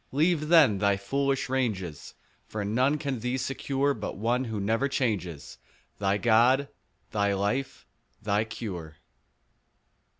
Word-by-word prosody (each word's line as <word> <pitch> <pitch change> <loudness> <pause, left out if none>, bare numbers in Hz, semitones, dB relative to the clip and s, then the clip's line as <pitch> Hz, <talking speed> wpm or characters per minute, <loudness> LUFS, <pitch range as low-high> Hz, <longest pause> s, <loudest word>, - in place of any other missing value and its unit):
Leave 155 +2 +2
then 150 - +6
thy 100 -1 +2
foolish 135 +6 -1
ranges; 105 - -3 0.3
For 105 -1 -4
none 130 +8 +2
can 140 -4 -3
thee 125 +3 -2
secure 135 +2 -1
But 105 -6 -6
One 120 +5 0
who 110 -3 -4
never 115 +7 +1
changes— 105 - -3 0.4
Thy 100 0 +1
God, 120 +5 +4 0.4
thy 100 -1 +1
life, 105 +8 -2 0.3
thy 105 0 +1
cure. 90 -9 -7
115 Hz, 125 wpm, -27 LUFS, 100-135 Hz, 0.4 s, then